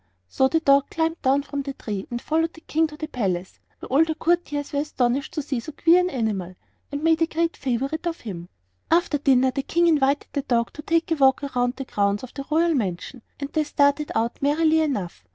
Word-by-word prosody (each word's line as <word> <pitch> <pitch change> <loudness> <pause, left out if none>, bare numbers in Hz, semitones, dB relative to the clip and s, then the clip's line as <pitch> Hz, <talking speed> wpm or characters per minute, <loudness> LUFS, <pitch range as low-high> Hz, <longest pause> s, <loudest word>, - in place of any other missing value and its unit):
So 265 - +2
the 325 +4 +1
dog 275 -2 +4
climbed 325 +1 -1
down 275 +1 +2
from 285 0 -4
the 275 0 -5
tree 200 -3 -5
and 240 - -3
followed 325 +5 0
the 320 - -15
King 320 0 +1
to 300 0 -12
the 310 - -4
palace, 190 - -3 0.2
where - - -10
all 275 +5 +5
the 320 -1 -2
courtiers 310 -4 -1
were 285 - +1
astonished 270 -2 -1
to 305 - -2
see 270 -3 -2
so 310 +6 -8
queer 335 +4 +5
an 360 0 +1
animal, 205 - -2 0.4
and 285 +1 -4
made 325 0 +3
a 330 - +4
great 335 +1 -1
favorite 275 +6 -2
of 335 0 -4
him. 175 -6 -7 0.4
After 330 -3 +2
dinner 260 -2 +3
the 275 - -2
King 340 +5 +1
invited 290 -3 +2
the 285 - 0
dog 235 -4 0
to 300 - -8
take 330 +2 0
a - - +4
walk 270 0 +4
around 250 -2 -1
the 270 - -6
grounds 200 -2 0
of 255 - -9
the 275 -1 -7
royal 330 +2 +3
mansion, 220 - -3 0.2
and 280 -1 -6
they 310 - +2
started 290 0 +1
out 230 +1 -1
merrily 315 +3 +3
enough. 205 - -3
280 Hz, 225 wpm, -24 LUFS, 245-320 Hz, 0.4 s, all